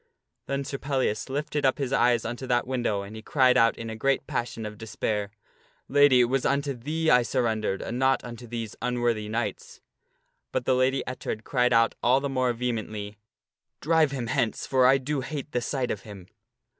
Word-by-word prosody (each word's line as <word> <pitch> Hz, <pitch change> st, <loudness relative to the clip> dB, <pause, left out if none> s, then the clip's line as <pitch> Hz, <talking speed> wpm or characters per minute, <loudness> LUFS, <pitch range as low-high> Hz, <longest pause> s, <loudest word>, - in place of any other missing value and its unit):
Then 140 Hz, 0 st, -1 dB
Sir 135 Hz, 0 st, -5 dB
Pellias 135 Hz, -5 st, -1 dB
lifted 145 Hz, +1 st, -2 dB
up 135 Hz, -1 st, +3 dB
his 135 Hz, -2 st, -2 dB
eyes 120 Hz, -2 st, +3 dB
unto 120 Hz, +3 st, -5 dB
that 120 Hz, -1 st, +1 dB
window 120 Hz, -6 st, -1 dB
and 100 Hz, +2 st, -9 dB
he 110 Hz, -, -8 dB
cried 130 Hz, +1 st, +3 dB
out 115 Hz, 0 st, +4 dB
in 115 Hz, -, -6 dB
a 110 Hz, -, -5 dB
great 135 Hz, +5 st, 0 dB
passion 115 Hz, -2 st, -3 dB
of 105 Hz, -1 st, -7 dB
despair, 105 Hz, -2 st, -2 dB, 0.3 s
" -, -, -36 dB
Lady, 145 Hz, -3 st, +5 dB
it -, -, +6 dB
was 125 Hz, +2 st, 0 dB
unto 140 Hz, 0 st, 0 dB
thee 155 Hz, +6 st, -1 dB
I 125 Hz, -, +6 dB
surrendered, 110 Hz, -5 st, -1 dB
and 120 Hz, +2 st, -4 dB
not 130 Hz, 0 st, +2 dB
unto 120 Hz, 0 st, -9 dB
these 115 Hz, -2 st, -5 dB
unworthy 120 Hz, -3 st, 0 dB
knights." 455 Hz, -, -4 dB, 0.7 s
But -, -, -2 dB
the 130 Hz, -, +3 dB
Lady 130 Hz, +1 st, +2 dB
Ettard 125 Hz, -3 st, -5 dB
cried 125 Hz, 0 st, +1 dB
out 115 Hz, -1 st, +4 dB
all 130 Hz, +2 st, +4 dB
the 140 Hz, 0 st, -3 dB
more 130 Hz, -2 st, +1 dB
vehemently, 110 Hz, -3 st, -4 dB, 0.6 s
"Drive 160 Hz, -1 st, +3 dB
him 135 Hz, -3 st, -4 dB
hence, 115 Hz, 0 st, -1 dB
for 130 Hz, -1 st, +4 dB
I 135 Hz, +1 st, +6 dB
do 135 Hz, +1 st, -2 dB
hate 145 Hz, +2 st, -6 dB
the 125 Hz, -, 0 dB
sight 125 Hz, 0 st, -2 dB
of -, -, -4 dB
him." 100 Hz, -5 st, -11 dB
125 Hz, 195 wpm, -26 LUFS, 115-135 Hz, 0.7 s, it